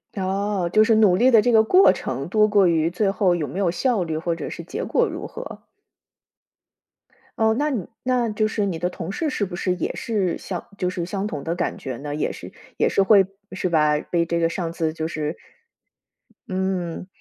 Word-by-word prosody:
哦， 195 -1 -1
就 215 0 +5
是 220 0 +3
努 205 -5 +5
力 255 +4 +5
的 225 -4 +6
这 245 - +2
个 220 -1 +6
过 370 - +6
程 - - -4
多 215 -1 +4
过 205 -2 +4
于 165 -1 +2
最 195 +2 0
后 185 -3 +2
有 155 -4 -2
没 190 - -5
有 185 -4 +2
效 200 +2 0
率， 160 -2 -3
或 165 +1 -1
者 - - -6
是 - - -7
结 - - -5
果 - - +1
如 - - -6
何。 - - -9 1.8
哦， 220 0 +3
那 300 +1 +1
你 225 - -3
那 250 -2 +1
就 215 +1 0
是 210 -1 -1
你 170 -4 -3
的 175 +1 0
同 180 0 -6
事 315 +7 -2
是 210 -6 -1
不 175 - -7
是 180 0 -1
也 175 - -3
是 200 -6 -1
像 180 -3 -5
就 180 -2 -1
是 175 -2 -3
相 195 +2 -3
同 145 -8 -5
的 165 - -2
感 175 - -2
觉 130 -3 -5
呢？ 145 +1 -5
也 150 - -1
是 - - -10 0.3
也 - - +2
是 195 - +3
会 195 -2 +5 0.2
是 185 -1 -2
吧？ 150 -2 +3
被 170 -1 0
这 170 0 -1
个 165 0 +2
上 170 -1 -4
司 160 -2 -1
就 160 0 -4
是 155 -1 -4 1.1
嗯， 185 -2 -2
185 Hz, 230 characters per minute, -23 LUFS, 170-215 Hz, 1.8 s, 的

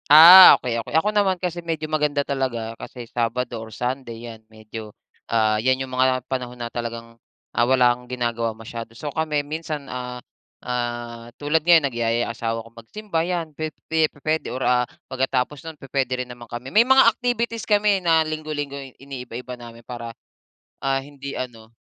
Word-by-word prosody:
Ah, 170 +5 +11
okey, 115 -2 -2
okey, 130 - -7
ako 200 +6 +2
naman 200 -3 +2
kasi 175 -1 -3
medyo 165 -2 -3
maganda 150 -2 0
talaga, 125 -5 -2
kasi 125 -2 -8
Sabado 120 0 -2
or 110 - -9
Sunday 120 0 -4
yan 115 -2 -9
medyo, 110 0 -9 0.4
ah, 110 -2 +2
yan 130 +2 +2
yung 130 -1 -9
mga 130 0 +2
panahon 125 -2 -4
na 120 -1 -5
talagang, 115 -1 -6 0.3
ah, 120 - +3
wala 125 -2 +5
kang 125 0 -13
ginagawa 120 -2 -2
masyado 115 +1 -8
so, 145 +2 -5
kami 150 -2 -1
minsan, 155 -1 -5
ah, 125 0 -5 0.5
ah, 120 -1 -4
tulad 150 +2 +1
ngayon 165 -2 +5
nagyayaya 120 -2 0
asawa 115 -1 -3
ko - - -14
magsimba 165 - -4
yan, 170 -2 -2
pe 155 +2 -3 0.2
pe 160 -1 +2
pu-puwede 155 +2 -2
or, 130 +1 -4
ah, 125 0 +3 0.2
pagkatapos 130 +2 -1
nun 160 - -11
pu-puwede 130 -2 -2
rin - - -21
naman 120 -1 -11
kami 120 +2 -7
may 225 +4 +5
mga 265 0 +7
activities 235 -2 -2
kami 205 -2 +3
na 165 -2 +3
linggo-linggo 155 -2 -4 0.2
iniiba-iba 125 -2 -8
namin 120 -1 -11
para, 115 -2 -7 0.7
ah, 135 0 +1
hindi 140 0 -8
ano 115 -3 -7
130 Hz, 170 wpm, -23 LUFS, 120-155 Hz, 0.7 s, Ah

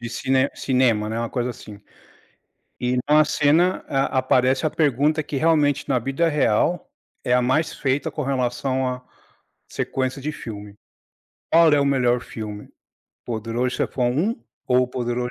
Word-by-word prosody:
de 120 - -5
cine 130 +3 +1
cinema, 125 -5 +1
né, 110 +1 -3
uma 115 0 -2
coisa 125 0 -2
assim. 105 -3 -11 1.0
E 125 +1 0
na 150 +1 +6
cena 160 +6 +2
a 135 -1 0
aparece 130 +2 +2
a - - 0
pergunta 150 +1 +1
que, 145 -1 -6
realmente, 150 -2 +2
na 135 -3 +2
vida 135 +7 0
real 150 +3 +1 0.3
é 125 - +2
a 125 - +3
mais 150 +6 0
feita 135 +1 -1
com 150 - -4
relação 130 0 -1
a 125 0 -5 0.7
sequência 130 +1 -3
de 155 +2 -3
filme. 105 -7 -9 0.8
Qual 165 -1 +6
é 145 - +4
o - - +2
melhor 125 -3 +2
filme? 105 -3 -8
O - - -24 0.5
Poderoso 115 +2 -2
Chefão 125 -2 0
1 180 - -1 0.2
ou 125 0 +2
Poderoso 125 0 -3
130 Hz, 155 wpm, -22 LUFS, 120-145 Hz, 1.0 s, na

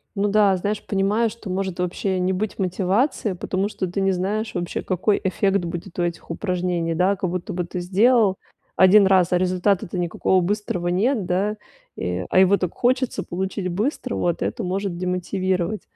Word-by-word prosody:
Ну 200 +1 +1
да, 205 -2 +4
знаешь, 205 +3 -2
понимаю, 205 +4 +1
что 220 -3 -10
может 190 -1 -3
вообще 185 +1 -1
не 185 +1 +1
быть 205 +3 -3
мотивации, 195 - 0
потому 190 +3 -2
что 185 -3 -3
ты 195 +3 -3
не 195 0 +2
знаешь 205 +4 -2
вообще, 175 -1 -3
какой 195 +3 0
эффект 195 +1 +1
будет 175 +2 -6
у - - +2
этих 170 -1 -4
упражнений. 175 -3 -1
Да, 185 +4 +2
как 185 -2 -2
будто 180 -1 -4
бы 180 - -1
ты 180 - -5
сделал 200 +2 +3 0.4
1 190 +1 +6
раз, 185 -2 +4
а - - +4
результата-то 185 0 0
никакого 175 +2 +1
быстрого 180 -2 -2
нет, 210 +4 +1
да, 200 +4 0 0.4
и 90 0 -3
а 185 - +4
его 190 +1 +5
так 180 -2 -3
хочется 255 0 0
получить 190 +1 -3
быстро, 235 - -2
вот 175 -1 -1
это 230 - -3
может 190 0 -2
демотивировать. 185 +2 -1
190 Hz, 175 wpm, -22 LUFS, 180-205 Hz, 0.4 s, 1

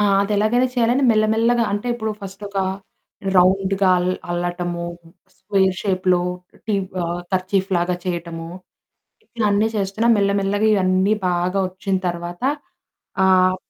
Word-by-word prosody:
ఆ! - - +3 0.2
అదెలాగైనా 215 +5 +2
చేయాలని 245 +3 +2
మెల్ల 215 -1 +3
మెల్లగా 230 +1 +2
అంటే, 205 +4 -3
ఇప్పుడు 220 -2 -3
ఫస్ట్ 195 +1 -9
ఒక 200 - -4 0.8
రౌండ్‌గా 190 +1 +3
అల్ 180 +1 0 0.2
అల్లటము, 175 0 -2 0.5
స్క్వేర్ 190 -1 +1
షేప్‌లో 185 -3 +1 0.5
టీ 215 - 0 0.3
ఆహ్, 170 +1 -3
కర్చీఫ్‌లాగా 185 -1 0
చేయటము, 170 -2 -4 0.9
ఇయన్నీ 210 0 +2
చేస్తున్నా, 200 +3 0
మెల్ల 200 -1 +2
మెల్లగా 205 +2 +1
ఇయన్నీ 190 +1 +2
బాగా 180 +2 0
వొచ్చిన 190 +1 -3
తర్వాత, 175 +2 -5 0.8
ఆహ్, 185 0 +4
190 Hz, 120 wpm, -21 LUFS, 180-210 Hz, 0.9 s, ఆహ్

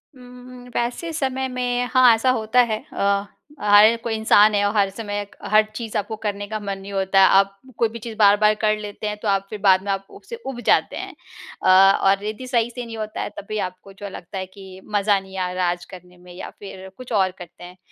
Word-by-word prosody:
हुँ, 250 -1 -14 0.2
हुँ। 245 - -14
वैसे 245 +8 -2
समय 265 -3 -2
में 245 -1 -1
हाँ, 255 -2 +7
ऐसा 225 +4 0
होता 230 +1 +2
है। 215 - -3
अ, 200 0 +1 0.4
हर 210 +2 +6
कोई 230 - -2
इंसान 215 -1 +5
है 205 - +2
और 205 +2 -1
हर 200 -2 +3
समय 205 0 -5
क - - -27
हर 215 0 +6
चीज़ 225 -1 -4
आपको 210 +2 -3
करने 205 -1 -4
का 215 0 -4
मन 200 -1 -4
नहीं 195 +1 -10
होता। 195 0 +3 0.2
आप 195 0 0 0.2
कोई 230 - +2
भी 230 +1 -9
चीज़ 225 0 -8
बार-बार 210 0 +5
कर 215 0 +2
लेते 210 0 -6
हैं, 210 - -3
तो 210 - -6
आप 195 -1 +1
फिर 215 - -7
बाद 190 -1 +4
में 200 - -1
आप 195 0 -3
उससे 470 - -10
ऊब 245 -2 -6
जाते - - +2
हैं। - - -7 0.5
अ, - - +3 0.3
और 195 +1 +2
यदि 220 +4 -5
सही 240 -2 +1
से 245 0 -7
नहीं 225 -1 -8
होता 215 0 -5
है, - - -3
तब - - -7
भी 215 - -3
आपको 185 +2 -18
जो 200 +1 -8
लगता 185 +1 -9
है 190 - -3
कि 190 0 -13
मज़ा 205 -1 +2
नहीं 190 0 -11
आ 180 -1 -2
रहा 180 0 -1
आज 175 0 -6
करने 180 -1 -14
में, 180 0 -15
या 180 - -8
फिर 190 -1 -10
कुछ 255 -1 -11
और 190 -3 +2
करते 175 -1 -12
हैं। 180 +1 -12
205 Hz, 240 wpm, -22 LUFS, 195-225 Hz, 0.5 s, हाँ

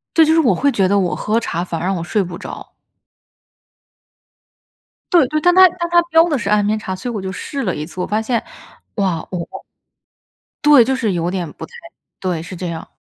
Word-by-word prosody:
这 325 - +6
就 315 - +3
是 325 - +4
我 275 -7 +3
会 285 - +2
觉 195 -7 +2
得 200 - +2
我 180 -2 0
喝 220 +2 0
茶 170 -6 -3
反 170 -2 -4
而 170 - -4
让 195 - 0
我 170 - -4
睡 200 +3 0
不 175 -1 -7
着。 - - -9 2.4
对 340 -6 +5
对， 305 +4 -1
但 355 +2 +4
它 375 0 +9
但 345 0 -5
它 345 0 +5
标 330 -1 +4
的 305 -5 0
是 205 -3 -3
安 210 0 +3
眠 215 +1 +1
茶， 190 -3 -5
所 185 +7 -6
以 235 - -5
我 205 - -3
就 190 0 -4
试 275 +7 -5
了 185 -6 -1
一 150 +1 -4
次。 180 +2 -7
我 - - -1
发 215 +1 0
现， 230 +1 -1 0.5
哇， 185 -6 -1
我 175 -2 -4 1.2
对， 295 -4 +7
就 265 +3 0
是 225 -7 -1
有 170 0 -1
点 180 -4 -4
不 160 - -8
太 - - -24 0.5
对， 180 -4 -2
是 175 +3 -8
这 180 +1 -5
样。 165 -1 -6
205 Hz, 245 characters per minute, -18 LUFS, 180-285 Hz, 2.4 s, 它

